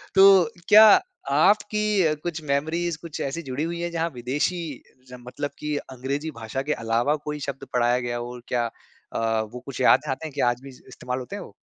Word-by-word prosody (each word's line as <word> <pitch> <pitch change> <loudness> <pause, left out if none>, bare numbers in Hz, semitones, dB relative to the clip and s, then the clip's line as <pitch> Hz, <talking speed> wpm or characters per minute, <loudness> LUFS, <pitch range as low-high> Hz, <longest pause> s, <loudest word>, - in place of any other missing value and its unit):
तो 195 -1 +8 0.3
क्या 215 +1 +10 0.5
आपकी 210 -4 +3
कुछ 165 -2 -3
मेमोरीज़ 160 +4 -1
कुछ 165 -3 -7
ऐसी 140 +5 -3
जुड़ी 130 +2 -3
हुई 170 +1 -3
है 175 - -2
जहाँ 165 0 -1
विदेशी 140 +9 -1 0.5
जन 125 -1 -11
मतलब 145 +3 -4
कि 150 0 -2 0.2
अंग्रेजी 140 +5 -3
भाषा 115 +3 -4
के - - +3
अलावा 115 +6 0
कोई 150 0 -4
शब्द 135 0 -5
पढ़ाया 120 0 +2
गया 120 -1 -3
हो, 120 +1 -6
क्या 120 -1 0 0.5
अ, 115 -1 0
वो 125 - -6
कुछ 135 -1 -6
याद - - +6
है 135 - 0
आते 135 +4 -4
हैं 150 - -11
क्या 125 - +2
आज 120 +1 -3
भी 135 - -9
इस्तेमाल 125 -1 -7
होते 125 - -7
हैं - - -6
वो? - - -14
140 Hz, 200 wpm, -24 LUFS, 125-170 Hz, 0.5 s, क्या